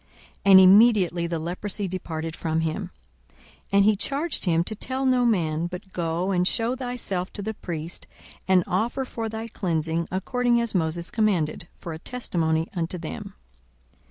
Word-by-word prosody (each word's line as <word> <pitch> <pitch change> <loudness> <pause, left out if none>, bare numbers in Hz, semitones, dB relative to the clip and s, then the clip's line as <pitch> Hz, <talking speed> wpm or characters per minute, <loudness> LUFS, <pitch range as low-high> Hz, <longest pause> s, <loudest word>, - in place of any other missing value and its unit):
And 195 -1 +9
immediately 190 -3 +6
the 170 -1 -2
leprosy 185 +5 -3
departed 165 -3 -4
from 160 0 -1
him. 160 -1 -2 0.4
42:005:014 70 - -31 0.3
And 200 0 +5
he 215 0 +5
charged 280 - -1
him 165 -2 +3
to 215 - -4
tell 260 +5 -3
no 255 -1 +3
man: 170 -7 +1
but 180 +2 -9
go, 170 +2 -1
and 180 -1 +2
shew 230 +5 +1
thyself 245 -8 -3
to 200 - -4
the 220 +2 -3
priest, 170 -4 -6 0.4
and 185 -2 +4
offer 235 +8 -1
for 225 -3 -4
thy 220 +1 -5
cleansing, 165 -5 -1
according 240 +6 +1
as 235 -1 -2
Moses 170 -1 -1
commanded, 180 -8 0
for 170 - -7
a 160 - -7
testimony 165 -8 -1
unto 170 +1 -2
them. 165 -2 -7
185 Hz, 160 wpm, -25 LUFS, 165-220 Hz, 0.4 s, And